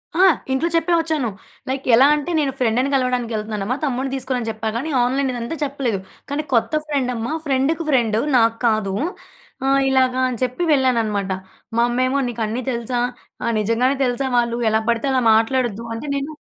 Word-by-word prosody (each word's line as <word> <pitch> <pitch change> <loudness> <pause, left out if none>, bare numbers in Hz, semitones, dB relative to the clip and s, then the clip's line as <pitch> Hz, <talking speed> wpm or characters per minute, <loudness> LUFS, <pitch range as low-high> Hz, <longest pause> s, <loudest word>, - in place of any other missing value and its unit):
ఆ! 370 +3 +5 0.3
ఇంట్లో 265 +5 +1
చెప్పే 330 +1 +2
వచ్చాను. 315 -7 -1 0.4
లైక్ 265 +1 -3
ఎలా 260 +4 +6
అంటే, 300 +3 -3
నేను 285 -3 +1
ఫ్రెండ్‌ని 250 +2 +1
కలవడానికి 250 -3 0
వెళ్తున్నానమ్మా, 215 +1 -2
తమ్ముడిని 265 -1 -1
తీసుకోనని 255 -3 -2
చెప్పా 220 0 -5
గాని 265 +7 -2
ఆన్‍లైన్ 265 +2 0
ఇదంతా 240 +6 -4
చెప్పలేదు. 270 -7 -1 0.3
కానీ 290 +2 -2
కొత్త 230 +5 +2
ఫ్రెండమ్మా, 255 -3 -2
ఫ్రెండ్‌కి 285 +4 0
ఫ్రెండ్ 235 -6 +2 0.2
నాకు 230 -1 +3
కాదు. 215 -3 +1 0.7
ఆహ్, 275 0 +4
ఇలాగా 260 -1 +2
అని 245 -3 -4
చెప్పి 255 +7 -1
వెళ్ళాననమాట. 225 -8 +1 0.4
"మా 235 - +4
అమ్మేమో 255 +3 +1
నీకన్నీ 230 0 -2
తెలుసా? 240 +1 -2 0.4
ఆహ్, 235 - 0
నిజంగానే 230 +6 +1
తెలుసా 250 +2 -1
వాళ్ళు? 235 -1 +1
ఎలా 220 0 +2
పడితే 235 +3 +1
అలా 260 - +2
మాట్లాడొద్దు." 230 -1 0
అంటే 230 +6 -6
నేను 280 +2 -3
250 Hz, 160 wpm, -21 LUFS, 230-275 Hz, 0.7 s, ఎలా